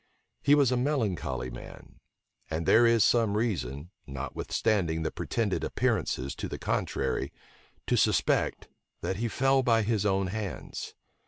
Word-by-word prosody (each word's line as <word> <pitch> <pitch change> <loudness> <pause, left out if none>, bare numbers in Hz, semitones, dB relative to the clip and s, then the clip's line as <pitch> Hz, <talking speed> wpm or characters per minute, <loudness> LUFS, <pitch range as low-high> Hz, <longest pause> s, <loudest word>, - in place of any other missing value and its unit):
He 145 +1 +5
was 140 -4 +4
a 125 - +2
melancholy 95 - -1
man; - - -11 0.5
and 80 +1 -2
there 120 +6 +6
is 115 -2 +4
some 115 -4 +3
reason, 85 - -2 0.2
notwithstanding 80 +5 -1
the 80 - -1
pretended - - -1
appearances 65 +1 -1
to - - -3
the - - -5
contrary, 65 +1 -1 0.5
to - - +1
suspect - - +1 0.3
that 95 - -2
he 115 +2 -1
fell 135 +3 +2
by 115 -3 +3
his 105 -2 0
own 95 -1 +1
hands. 105 -4 -5
105 Hz, 140 wpm, -29 LUFS, 80-115 Hz, 0.5 s, there